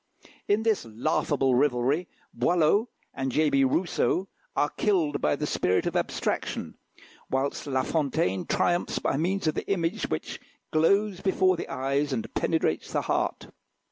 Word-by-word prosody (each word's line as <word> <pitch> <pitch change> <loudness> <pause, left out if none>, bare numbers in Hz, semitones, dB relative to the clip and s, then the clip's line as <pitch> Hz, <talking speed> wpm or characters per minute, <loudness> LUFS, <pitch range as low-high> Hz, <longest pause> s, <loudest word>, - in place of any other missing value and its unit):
In 205 +2 +2
this 220 -2 +1
laughable 135 +3 0
rivalry 135 +5 +2 0.3
Boileau 175 - +2 0.2
and 135 -1 -2
J. 155 +2 +2
B. 135 0 +4
Rousseau 180 +6 +1 0.3
are 145 - +1
killed 165 -9 +1
by - - +2
the 150 - -3
spirit 90 -9 +1
of - - -2
abstraction; - - -2 0.6
whilst 135 +2 -1
La 130 -2 +1
Fontaine 130 - 0
triumphs 175 0 +1
by - - 0
means 180 +6 0
of 155 - +2
the - - -4
image 180 +2 -1
which - - -4 0.3
glows 195 +4 +2
before 190 -1 +3
the 170 - -6
eyes 140 +2 0
and 115 - -4
penetrates 160 - 0
the - - 0
heart. - - -1
155 Hz, 145 wpm, -27 LUFS, 135-180 Hz, 0.6 s, B